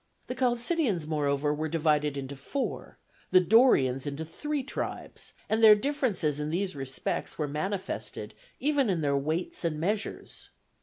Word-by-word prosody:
The - - -4
Chalcidians, 245 - +1
moreover, 145 -1 0
were 155 +1 -2
divided 150 -2 +1
into 140 0 -5
four, 255 - -4 0.3
the 185 - +7
Dorians 170 - +4
into 145 +3 -4
three 295 - -3
tribes, 270 - -5
and 220 +1 +1
their 215 -1 +10
differences 210 - 0
in 150 0 -2
these 185 +2 -1
respects 135 -2 -3
were 150 - -1
manifested 145 - -4 0.3
even 280 -3 +2
in 175 -4 +1
their 140 -2 +1
weights 155 +7 -2
and 160 -3 -1
measures. 205 +6 -3
165 Hz, 145 wpm, -29 LUFS, 145-225 Hz, 0.3 s, their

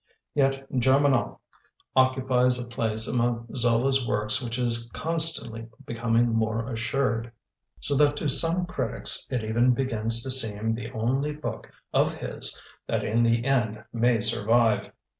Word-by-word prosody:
Yet 135 -1 0
Germinal 130 0 +1 0.5
occupies 130 -1 +2
a 125 - -5
place 110 -2 +1
among 120 -1 -2
Zola's 125 +2 +2
works 105 0 0
which 120 -1 -4
is 115 -1 0
constantly 160 -9 +2 0.2
becoming 115 0 0
more 115 0 -1
assured, 115 0 -2 0.5
so 145 - +2
that 145 0 +3
to 150 - -2
some 165 +6 +2
critics 175 - 0
it 125 -4 -2
even 120 +3 +1
begins 115 -3 0
to 130 - -4
seem 115 -3 0
the 115 0 -7
only 135 +7 -2
book 150 +1 -7 0.2
of - - +1
his - - -2 0.3
that - - -2
in 115 +2 0
the 115 0 +1
end 115 -5 -1
may 120 -1 +1
survive. 115 +1 +3
120 Hz, 140 wpm, -25 LUFS, 115-130 Hz, 0.5 s, that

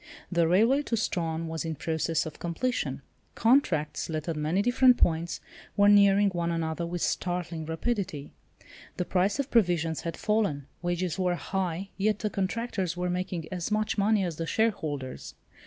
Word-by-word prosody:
The 170 -2 +3
railway 225 - +4
to 235 -5 -2
Strahan 165 -6 -1
was 160 0 -3
in 160 -1 -3
process 160 +2 -1
of 160 - -8
completion. 210 +9 -2 0.3
Contracts, 190 - +2
let 155 0 -3
at 165 - -1
many 155 +6 0
different 250 +1 +5
points, 165 0 +1 0.4
were 205 0 +6
nearing 200 0 +6
one 170 -1 -1
another 165 0 -2
with 175 0 -3
startling 175 -3 -2
rapidity. 165 -4 -3 0.7
The 180 - -1
price 190 +5 +1
of 280 -1 -3
provisions 175 -7 +2
had 165 -1 -4
fallen. 210 -11 0 0.2
Wages 175 0 -2
were 180 -1 +1
high—yet 195 +3 -2
the 210 -1 -2
contractors 190 -3 -2
were 180 0 -1
making 180 -2 -3
as 180 0 -3
much 215 0 0
money 205 0 +3
as 170 -4 -3
the 165 - -3
shareholders. 155 - -2
180 Hz, 155 wpm, -28 LUFS, 165-205 Hz, 0.7 s, were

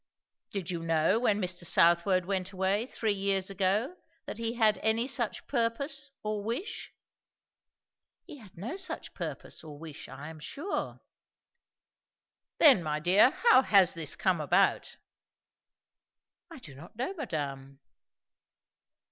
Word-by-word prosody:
"Did 190 -3 -4
you 170 -2 -4
know, 165 +5 +2
when 215 -4 +1
Mr. 180 -2 -3
Southwode 175 +2 +3
went 190 0 -2
away, 195 +4 0
three 220 -5 -1
years 195 -1 0
ago, 200 - 0 0.3
that - - -7
he 230 +1 -2
had 220 -3 +3
any 220 +2 +2
such 255 -4 0
purpose, 275 +4 -1
or 210 -1 -3
wish?" 245 - -4 1.3
"He - - -11
had 210 -9 -16
no 240 - -5
such 370 -4 -4
purpose, - - -6
or 150 -2 -10
wish, 155 -1 -9
I 140 +4 -9
am 160 -1 -11
sure." 295 - -5 1.6
"Then, 275 - +7
my 150 -2 -2
dear, 185 +9 +5
how 380 - +4
has 195 -8 +4
this 165 -2 -3
come - - 0
about?" - - +1 1.5
"I 330 - -10
do 165 - -11
not 145 +9 -14
know, 255 - -3
madame." 140 - -5
200 Hz, 130 wpm, -29 LUFS, 170-240 Hz, 1.6 s, Then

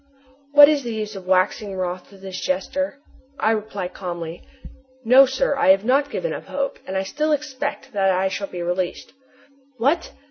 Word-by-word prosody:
What 290 0 +10
is 300 -1 +2
the 235 -3 -4
use 215 -1 -4
of 190 -1 -9
waxing 190 +2 +1
wroth 185 0 -4
with 195 -1 -16
this 190 -1 -6
jester? 275 +10 -2 0.4
I 220 - +3
reply 210 -4 -3
calmly: 175 -2 -6 0.6
"No, 260 +4 +7
sir. 265 +2 0
I - - +1
have 195 +2 +5
not 280 +4 +2
given - - -3
up - - -7
hope, 280 0 -3
and 190 - -2
I 190 - 0
still 305 +10 -1
expect 285 -2 -3
that 195 -2 +2
I 190 +1 +2
shall 195 +1 -3
be 175 -2 -6
released." 175 +1 -3 0.6
"What! 280 +9 +1
210 Hz, 180 wpm, -22 LUFS, 185-275 Hz, 0.6 s, What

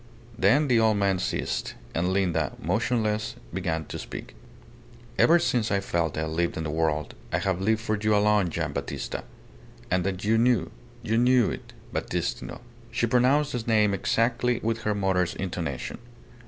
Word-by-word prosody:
Then 120 +9 +4
the 120 -3 +4
old 110 -2 +3
man 100 -2 +2
ceased; - - -2 0.2
and 90 +3 0
Linda, 85 -6 +1
motionless, 110 +4 0 0.2
began 85 -4 -2
to - - -6
speak. - - -8 0.9
"Ever 170 - +7
since 120 -8 +1
I 100 - +2
felt 85 -5 -1
I 80 - 0
lived 85 +2 -1
in 80 - -2
the 75 - -3
world, 80 -1 0 0.2
I - - +2
have 95 -2 -1
lived 110 +3 +2
for 110 -2 0
you 105 0 +1
alone, 105 -3 +3
Gian' - - -3
Battista. - - -4 0.7
And 90 -1 +2
that 95 0 -3
you 110 +2 +3
knew! 115 -8 +2 0.3
You 115 +2 +1
knew 125 -3 +4
it... - - -8 0.2
Battistino." - - -3 0.3
She - - 0
pronounced 130 +5 +3
the 125 - -2
name 105 -3 +3
exactly 115 +4 +1
with 115 0 0
her 105 -1 0
mother's 95 -3 +1
intonation. 85 -8 -4
105 Hz, 165 wpm, -26 LUFS, 90-115 Hz, 0.9 s, Ever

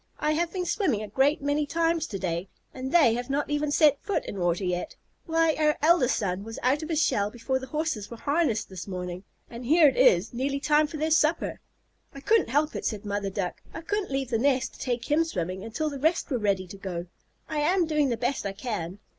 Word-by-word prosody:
I 300 - +1
have 335 +2 0
been 365 -2 -3
swimming 295 - 0
a - - -6
great 275 +7 +2
many 290 +1 0
times 330 0 +1
to 200 - -5
day, 175 0 -3 0.3
and 260 0 -5
they 300 -10 +5
have 245 +2 -4
not 290 +2 -1
even 295 0 0
set 290 -1 +4
foot 405 -2 -2
in 200 - -6
water 175 +1 0
yet. 180 -1 -2 0.3
Why, 325 -1 +3
our 300 -1 +3
eldest 310 -5 +4
son 195 -1 -2
was 225 +1 -8
out 265 +5 +2
of 315 - -6
his 320 -3 +1
shell 200 0 +1
before 255 +4 -2
the 260 - -8
Horses 300 -8 -2
were 235 - -8
harnessed 285 -3 0
this 190 0 -8
morning, 180 -1 -5 0.2
and 235 +1 -9
here 310 +5 +6
it 265 - +2
is 180 +7 +4
nearly 275 +3 -1
time 300 +1 +3
for 310 - -7
their 315 +2 -1
supper." 315 +1 +2 0.6
"I - - -7
couldn't 435 - +2
help 295 +4 +1
it," - - -4
said 215 -2 -2
the 205 - -6
mother 200 -1 -1
Duck. 190 -2 -4
"I 325 - -5
couldn't 410 +4 -2
leave 270 -2 -2
the 225 - +1
nest 260 0 +1
to - - -16
take 245 +1 -3
him 315 +2 +4
swimming 185 - -4
until 295 +8 -3
the 280 - -6
rest 320 +2 +1
were 250 - +1
ready 200 -3 0
to 185 +2 -10
go. 180 -3 -5 0.4
I 310 -2 -2
am 345 +4 +2
doing 305 -3 +1
the 235 - -1
best 245 +4 -1
I 200 - -3
can." 195 -5 -4
265 Hz, 240 wpm, -27 LUFS, 205-310 Hz, 0.6 s, here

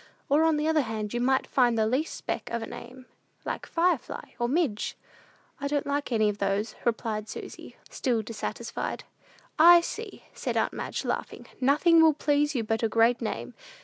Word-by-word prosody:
Or, 300 +3 +4
on 320 -2 +3
the 300 +1 0
other 320 -1 +3
hand, 220 -3 -4
you 240 - -1
might 265 +1 +2
find 245 -3 +2
the 220 - +3
least 260 +8 -1
speck - - -4
of 235 -1 -3
a - - -3
name, 255 +3 -10 0.4
like - - -4
Firefly, 340 -5 -1
or 240 0 0
Midge." 275 -8 0 0.6
"I 280 - -2
don't 290 0 -1
like 285 -1 -2
any 215 -2 +3
of 205 0 -2
those," 200 +2 -1
replied 220 -2 -1
Susy, - - -9
still 235 -4 -1
dissatisfied. 220 +1 -5 0.6
"I 345 +2 +9
see," 430 +4 -7
said - - -3
aunt - - +1
Madge, - - -4
laughing, - - -4
"nothing 300 +5 +5
will 320 -1 +6
please 295 0 +1
you 235 - 0
but 225 0 -1
a 225 - +1
great 230 +2 +3
name. - - -4
255 Hz, 180 wpm, -27 LUFS, 225-300 Hz, 0.6 s, I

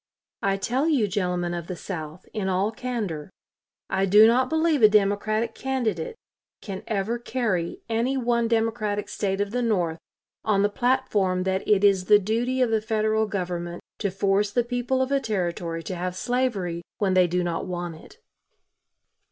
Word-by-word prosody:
I 195 0 +1
tell 250 +9 0
you, 270 -10 +3
gentlemen 180 -3 -1
of 170 -1 -5
the 180 - -4
South, 160 -1 -7
in 200 -3 -1
all 190 +3 +1
candor, 220 -11 -4 0.6
I 190 0 0
do 210 +3 +8
not 250 +3 +4
believe 320 -2 +2
a 215 - +8
Democratic 215 +2 +1
candidate 265 - -2 0.4
can 195 -3 -6
ever 220 +3 -1
carry 215 -9 -2
any 235 +4 0
one 235 -2 +1
Democratic 225 -2 0
State 195 -1 -2
of 205 0 -1
the 245 +2 -1
North 180 -8 0 0.4
on 200 -2 +2
the 205 - +3
platform 205 -6 +1
that 190 0 -1
it 205 -1 +3
is 195 -3 +4
the 210 - +7
duty 235 +6 0
of 235 - 0
the 220 -1 +2
Federal 220 0 +1
Government 175 -3 -4 0.2
to 200 - 0
force 195 +2 +1
the 240 +4 +1
people 245 +2 0
of 260 - -4
a 280 - +3
Territory 175 -7 -2
to 190 - -5
have 180 +1 -3
slavery 205 -8 -1 0.2
when 195 -2 +1
they 185 -1 +5
do 180 +1 0
not 170 0 -2
want 175 -1 -4
it." - - -16
205 Hz, 170 wpm, -25 LUFS, 185-235 Hz, 0.6 s, do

